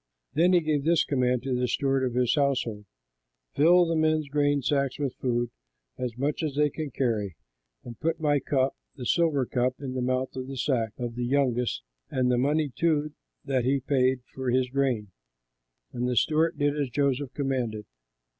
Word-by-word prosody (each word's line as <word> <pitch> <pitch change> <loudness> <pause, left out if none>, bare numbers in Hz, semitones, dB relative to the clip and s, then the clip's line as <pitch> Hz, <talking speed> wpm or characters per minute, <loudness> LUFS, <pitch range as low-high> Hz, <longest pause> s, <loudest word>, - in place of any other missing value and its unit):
Then 170 +5 +4
he 175 - +5
gave 155 -3 0
this 165 +1 +3
command 125 -3 0
to 135 -1 -2
the 125 0 0
steward 135 0 +1
of 125 -2 -1
his 125 -1 +2
household: 125 -7 0 0.7
"Fill 175 +5 +5
the 165 0 0
men's 155 -1 +2
grain 145 -1 +1
sacks 140 -1 0
with 140 -3 -2
food, 120 -2 -1 0.4
as 125 -2 -4
much 140 +5 -1
as 150 -4 -2
they 150 0 +2
can 155 0 -4
carry, 110 -8 -1 0.5
and 120 -2 -10
put 165 +1 -1
my 145 -2 +2
cup, 135 0 0 0.2
the 130 -4 -7
silver 155 -3 +2
cup, 125 +1 0
in 135 -2 -5
the 130 - -2
mouth 130 +1 -1
of 130 0 -5
the 135 0 -6
sack 115 -5 0
of 120 -1 -4
the 120 +1 -3
youngest 125 -2 0 0.3
and 125 -1 +1
the 120 - +2
money 145 +3 +1
too 155 -3 +1 0.3
that 130 -3 0
he 135 +3 +2
paid 130 -1 +1
for 130 -1 -3
his 125 0 +1
grain." 130 -7 0 0.8
And 125 +1 -1
the 125 - 0
steward 160 +5 +2
did 145 0 +1
as 145 -3 -1
Joseph 140 0 -1
commanded. 125 -6 -2
135 Hz, 185 wpm, -27 LUFS, 125-145 Hz, 0.8 s, he